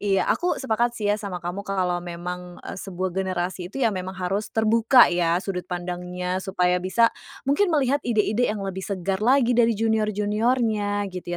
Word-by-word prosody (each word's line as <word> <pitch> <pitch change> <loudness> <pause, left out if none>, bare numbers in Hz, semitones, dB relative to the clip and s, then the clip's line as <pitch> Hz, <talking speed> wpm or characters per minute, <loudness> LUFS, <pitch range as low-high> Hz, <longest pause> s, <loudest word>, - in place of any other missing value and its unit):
Iya, 195 -2 +1
aku 355 +1 -1
sepakat 240 -1 0
sih 205 -1 +1
ya 210 - -2
sama 180 -4 -6
kamu 175 +3 -3
kalau 185 -3 -1
memang, 175 +1 -6
e - - -6
sebuah 185 -1 -4
generasi 185 -1 -2
itu 265 +4 -2
ya 220 - +3
memang 185 0 -5
harus 190 +3 -2
terbuka 225 0 +5
ya 170 -1 +2
sudut 180 -2 -4
pandangnya, 180 +1 -3
supaya 180 -2 +1
bisa 230 +6 +3 0.3
mungkin 290 +9 +2
melihat 285 -3 +2
ide-ide 225 -1 +1
yang 210 -2 -3
lebih 190 -1 -4
segar 190 0 -2
lagi 245 +1 +4
dari 230 -2 +3
junior-juniornya, 215 0 +1
gitu 175 -1 -5
200 Hz, 170 wpm, -24 LUFS, 180-225 Hz, 0.3 s, terbuka